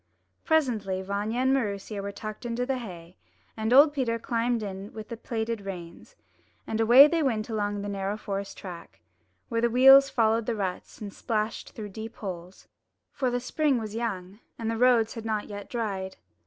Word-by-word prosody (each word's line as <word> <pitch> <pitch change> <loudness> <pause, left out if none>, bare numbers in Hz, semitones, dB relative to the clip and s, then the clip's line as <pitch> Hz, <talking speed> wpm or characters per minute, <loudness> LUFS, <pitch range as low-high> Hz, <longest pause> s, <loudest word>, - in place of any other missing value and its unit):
Presently 220 -12 +1
Vanya 205 +5 -2
and 260 +1 +3
Maroosia 205 -4 -2
were 200 0 -4
tucked 215 +1 -7
into 240 +1 -2
the 265 0 -1
hay, 180 -6 -10 0.4
and 220 +1 -2
old 290 +3 +7
Peter 245 -5 0
climbed 230 -1 -1
in 195 0 -6
with 215 -1 -8
the 230 - -4
plaited 230 -1 -3
reins, 185 - -9 0.5
and 220 0 -1
away 240 +5 +9
they 330 +2 +1
went 230 -6 0
along 205 -1 -2
the - - -4
narrow 200 +1 -2
forest 200 -2 -5
track, 175 -3 -10 0.5
where 230 -2 -1
the 235 - +3
wheels 270 +3 +8
followed 225 -2 +1
the 235 - 0
ruts 190 -3 -4
and 200 -2 -6
splashed 215 -1 -3
through 210 -2 -6
the - - -17
deep 225 +1 -7
holes; 180 -2 -8 0.4
for 260 -2 -1
the 245 0 -1
spring 280 +2 +1
was 215 -2 -5
young, 205 -4 -4 0.2
and 225 -1 -2
the - - -2
roads 240 -2 +4
had 225 - -7
not 215 -2 -2
yet 205 -1 -8
dried. 195 -5 -3
220 Hz, 185 wpm, -27 LUFS, 200-240 Hz, 0.5 s, away